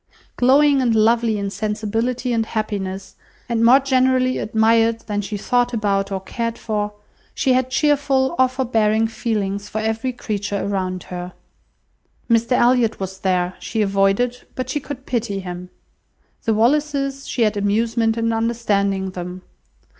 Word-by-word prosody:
Glowing 275 Hz, +2 st, +4 dB
and 235 Hz, -3 st, +2 dB
lovely 225 Hz, 0 st, +3 dB
in 200 Hz, -1 st, -3 dB
sensibility 225 Hz, +4 st, -2 dB
and 225 Hz, -1 st, 0 dB
happiness, 195 Hz, -3 st, -4 dB, 0.3 s
and 230 Hz, -1 st, 0 dB
more 250 Hz, +4 st, +7 dB
generally 255 Hz, -1 st, +2 dB
admired 225 Hz, +1 st, +2 dB
than 205 Hz, -1 st, -3 dB
she 205 Hz, +1 st, -5 dB
thought 245 Hz, +4 st, +1 dB
about 200 Hz, -2 st, 0 dB
or 195 Hz, -, -1 dB
cared 230 Hz, +4 st, -4 dB
for, 210 Hz, -2 st, -2 dB, 0.4 s
she 260 Hz, -, +2 dB
had 255 Hz, 0 st, +1 dB
cheerful 275 Hz, -1 st, +2 dB
or 260 Hz, -, +6 dB
forbearing 225 Hz, -4 st, +1 dB
feelings 205 Hz, -3 st, -2 dB
for 215 Hz, -, -3 dB
every 225 Hz, +4 st, -1 dB
creature 205 Hz, -4 st, -3 dB
around 185 Hz, -2 st, -2 dB
her. 180 Hz, 0 st, -6 dB, 0.9 s
Mr 230 Hz, +1 st, +2 dB
Elliot 245 Hz, -2 st, +3 dB
was 190 Hz, 0 st, -5 dB
there; 180 Hz, -1 st, 0 dB
she 220 Hz, -1 st, -1 dB
avoided, 200 Hz, +5 st, +1 dB
but 255 Hz, 0 st, -3 dB
she 295 Hz, -, -1 dB
could 270 Hz, -2 st, -8 dB
pity 225 Hz, -5 st, -2 dB
him. 180 Hz, -1 st, -7 dB, 0.8 s
The 225 Hz, -, +2 dB
Wallises, 275 Hz, +3 st, +1 dB
she 240 Hz, -, +1 dB
had 215 Hz, -1 st, +1 dB
amusement 225 Hz, +3 st, +1 dB
in 230 Hz, 0 st, 0 dB
understanding 200 Hz, -4 st, 0 dB
them. 180 Hz, 0 st, -7 dB
225 Hz, 145 wpm, -20 LUFS, 200-250 Hz, 0.9 s, more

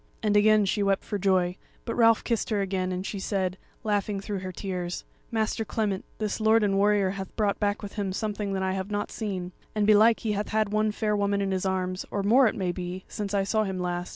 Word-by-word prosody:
And 210 Hz, -1 st, +2 dB
again 210 Hz, 0 st, +5 dB
she 205 Hz, +2 st, 0 dB
wept 195 Hz, -1 st, +1 dB
for 205 Hz, -, -3 dB
joy; 185 Hz, -1 st, +2 dB, 0.3 s
but 230 Hz, -, -2 dB
Ralph 230 Hz, -1 st, +4 dB
kissed 230 Hz, -3 st, -1 dB
her 215 Hz, -2 st, +1 dB
again, 190 Hz, -1 st, -1 dB
and 185 Hz, +1 st, -3 dB
she 200 Hz, -, -4 dB
said, 190 Hz, -2 st, -1 dB, 0.2 s
laughing 205 Hz, -2 st, 0 dB
through 200 Hz, 0 st, -4 dB
her 185 Hz, 0 st, -5 dB
tears: 180 Hz, -2 st, -4 dB, 0.2 s
"Master 225 Hz, 0 st, 0 dB
Clement, 210 Hz, -3 st, -2 dB
this 215 Hz, -1 st, -2 dB
lord 220 Hz, 0 st, +4 dB
and 200 Hz, -1 st, +2 dB
warrior 200 Hz, -1 st, +3 dB
hath 195 Hz, -1 st, -7 dB
brought 210 Hz, -2 st, 0 dB
back 205 Hz, 0 st, 0 dB
with 200 Hz, -, -6 dB
him 200 Hz, -2 st, -1 dB
something 205 Hz, 0 st, -2 dB
that 190 Hz, -1 st, -1 dB
I 190 Hz, -, 0 dB
have 190 Hz, +1 st, -3 dB
not 205 Hz, 0 st, -2 dB
seen; 190 Hz, -5 st, -4 dB, 0.2 s
and 210 Hz, -1 st, +2 dB
belike 215 Hz, +2 st, +5 dB
he 220 Hz, -, -1 dB
hath 205 Hz, 0 st, -1 dB
had 215 Hz, -1 st, 0 dB
one 215 Hz, 0 st, +2 dB
fair 210 Hz, 0 st, 0 dB
woman 200 Hz, 0 st, +1 dB
in 195 Hz, -1 st, 0 dB
his 190 Hz, 0 st, 0 dB
arms, 185 Hz, 0 st, -1 dB
or 200 Hz, -, -2 dB
more 245 Hz, +5 st, +6 dB
it -, -, -1 dB
may 185 Hz, -3 st, -1 dB
be, 180 Hz, +1 st, -5 dB
since 205 Hz, -1 st, -4 dB
I 195 Hz, -, +2 dB
saw 215 Hz, +2 st, +1 dB
him 190 Hz, -2 st, -3 dB
last. 180 Hz, 0 st, -2 dB
200 Hz, 235 wpm, -27 LUFS, 190-215 Hz, 0.3 s, more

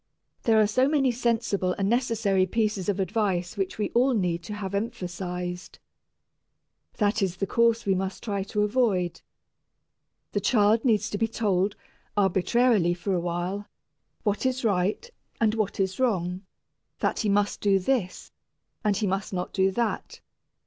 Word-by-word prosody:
There 225 Hz, -2 st, +5 dB
are 215 Hz, -, +5 dB
so 255 Hz, +6 st, +2 dB
many 275 Hz, -4 st, +3 dB
sensible 230 Hz, -6 st, 0 dB
and 195 Hz, -, 0 dB
necessary 220 Hz, -5 st, +1 dB
pieces 210 Hz, -2 st, 0 dB
of 200 Hz, -1 st, 0 dB
advice 190 Hz, -3 st, -1 dB
which 195 Hz, -2 st, -2 dB
we 210 Hz, -, -2 dB
all 255 Hz, +2 st, +3 dB
need 175 Hz, -4 st, 0 dB
to 210 Hz, -, -5 dB
have 200 Hz, -2 st, -5 dB
emphasized. 180 Hz, -4 st, -4 dB, 1.2 s
That 210 Hz, 0 st, +1 dB
is 185 Hz, -2 st, 0 dB
the 195 Hz, -, -1 dB
course 230 Hz, +3 st, +2 dB
we 195 Hz, -, +3 dB
must 190 Hz, 0 st, -3 dB
try 200 Hz, -3 st, -2 dB
to 210 Hz, 0 st, 0 dB
avoid. 205 Hz, -7 st, +1 dB, 1.1 s
The -, -, 0 dB
child 220 Hz, -1 st, +3 dB
needs 220 Hz, -6 st, +2 dB
to 205 Hz, -, -3 dB
be 225 Hz, -, +2 dB
told, 205 Hz, -3 st, 0 dB, 0.4 s
arbitrarily 195 Hz, 0 st, +3 dB
for 185 Hz, +3 st, -2 dB
a 180 Hz, -, +1 dB
while, 175 Hz, +4 st, -3 dB, 0.6 s
what 205 Hz, -2 st, 0 dB
is 260 Hz, -1 st, 0 dB
right, 200 Hz, -, +1 dB, 0.3 s
and 220 Hz, -2 st, +3 dB
what 215 Hz, -3 st, -2 dB
is 190 Hz, +2 st, -1 dB
wrong, 185 Hz, -6 st, 0 dB, 0.5 s
that -, -, -1 dB
he 215 Hz, -, 0 dB
must 205 Hz, 0 st, +1 dB
do 200 Hz, -1 st, +4 dB
this, 190 Hz, -1 st, -1 dB, 0.5 s
and 205 Hz, -2 st, +2 dB
he 210 Hz, -, 0 dB
must 195 Hz, +1 st, -2 dB
not 180 Hz, -1 st, -3 dB
do 190 Hz, -1 st, +3 dB
that. 230 Hz, +3 st, -2 dB
205 Hz, 155 wpm, -26 LUFS, 185-225 Hz, 1.2 s, There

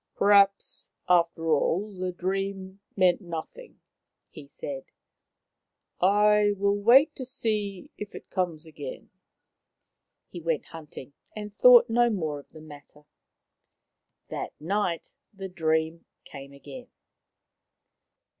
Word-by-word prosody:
" -, -, -54 dB
Perhaps, 200 Hz, -1 st, +3 dB, 0.2 s
after 170 Hz, -2 st, +2 dB
all, 190 Hz, +7 st, +1 dB
the 185 Hz, -1 st, -3 dB
dream 190 Hz, +1 st, -4 dB, 0.2 s
meant 185 Hz, -2 st, +3 dB
nothing," 175 Hz, -, -8 dB, 0.5 s
he 150 Hz, -4 st, -12 dB
said. 140 Hz, -1 st, -7 dB, 0.7 s
" -, -, -55 dB
I 205 Hz, +2 st, +4 dB
will 200 Hz, +1 st, +2 dB
wait 270 Hz, +8 st, +6 dB
to 260 Hz, -, -5 dB
see 215 Hz, -7 st, -3 dB
if 210 Hz, -1 st, -7 dB
it -, -, -11 dB
comes 175 Hz, -4 st, -2 dB
again." 470 Hz, -, -9 dB, 1.2 s
He 175 Hz, -, -9 dB
went 165 Hz, -2 st, -1 dB
hunting, 150 Hz, -4 st, -11 dB, 0.2 s
and 210 Hz, -1 st, -7 dB
thought 245 Hz, 0 st, +7 dB
no 240 Hz, +1 st, +3 dB
more 160 Hz, -9 st, -2 dB
of 140 Hz, -, -17 dB
the 155 Hz, -, -14 dB
matter. 150 Hz, -1 st, -15 dB, 1.2 s
That -, -, -6 dB
night 175 Hz, 0 st, -2 dB, 0.2 s
the 195 Hz, 0 st, -6 dB
dream 160 Hz, -1 st, -1 dB, 0.2 s
came 140 Hz, -1 st, -11 dB
again. 245 Hz, -, -11 dB
185 Hz, 115 wpm, -27 LUFS, 160-210 Hz, 1.2 s, thought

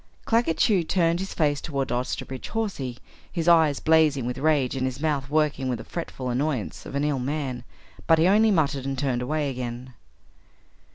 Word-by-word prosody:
Claggett 225 Hz, -8 st, +2 dB
Chew 200 Hz, -5 st, +3 dB
turned 170 Hz, 0 st, +1 dB
his 190 Hz, +1 st, -5 dB
face 145 Hz, -3 st, +1 dB
toward 140 Hz, -4 st, -3 dB
Osterbridge 125 Hz, +1 st, -3 dB
Hawsey, 185 Hz, -, -3 dB, 0.3 s
his 170 Hz, -2 st, -3 dB
eyes 160 Hz, -4 st, +5 dB
blazing 155 Hz, -5 st, +3 dB
with 125 Hz, +2 st, -3 dB
rage 145 Hz, -3 st, +2 dB
and 130 Hz, -1 st, 0 dB
his 130 Hz, +1 st, -5 dB
mouth 145 Hz, -3 st, -1 dB
working 150 Hz, -3 st, +1 dB
with 125 Hz, -, -1 dB
the -, -, -8 dB
fretful 130 Hz, -7 st, -5 dB
annoyance 125 Hz, -, -2 dB
of -, -, -7 dB
an 140 Hz, -, 0 dB
ill 145 Hz, -3 st, 0 dB
man, 130 Hz, -2 st, -3 dB, 0.4 s
but 165 Hz, -, +6 dB
he 160 Hz, +2 st, +4 dB
only 215 Hz, +3 st, +5 dB
muttered 150 Hz, -8 st, +1 dB
and 135 Hz, 0 st, -2 dB
turned 130 Hz, -2 st, -1 dB
away 150 Hz, +3 st, -1 dB
again. 125 Hz, 0 st, -6 dB
145 Hz, 180 wpm, -25 LUFS, 130-160 Hz, 0.4 s, but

